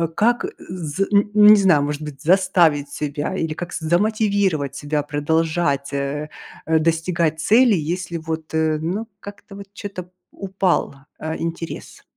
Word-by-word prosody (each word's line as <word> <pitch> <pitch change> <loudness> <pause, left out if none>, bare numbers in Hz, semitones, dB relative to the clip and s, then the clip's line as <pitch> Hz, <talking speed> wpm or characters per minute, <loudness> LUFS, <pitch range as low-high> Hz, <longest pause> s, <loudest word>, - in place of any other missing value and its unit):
как, 240 +8 +2
з 175 0 -3
н 205 +1 +4
не 210 0 +8
знаю, 185 -8 +4
может 145 +1 -3
быть, 150 -2 -8
заставить 170 -5 +3
себя 150 +4 -4
или 160 -4 -2
как 175 +2 -7
замотивировать 190 - 0
себя 145 +1 -2
продолжать, 150 -1 0
э, 140 +2 -3 0.4
э, 160 0 +2
достигать 165 0 0
цели, 235 +6 +5
если 170 +2 -3
вот, 160 -1 -6
э, 160 -1 +1
ну, 190 +8 -3
как-то 200 0 -11
вот 200 0 -10
чё-то 200 -2 -7
п 175 - -25 0.2
упал, 190 -6 -1 0.2
э, 160 +1 -4
интерес? 165 0 -6
165 Hz, 145 wpm, -21 LUFS, 150-195 Hz, 0.4 s, не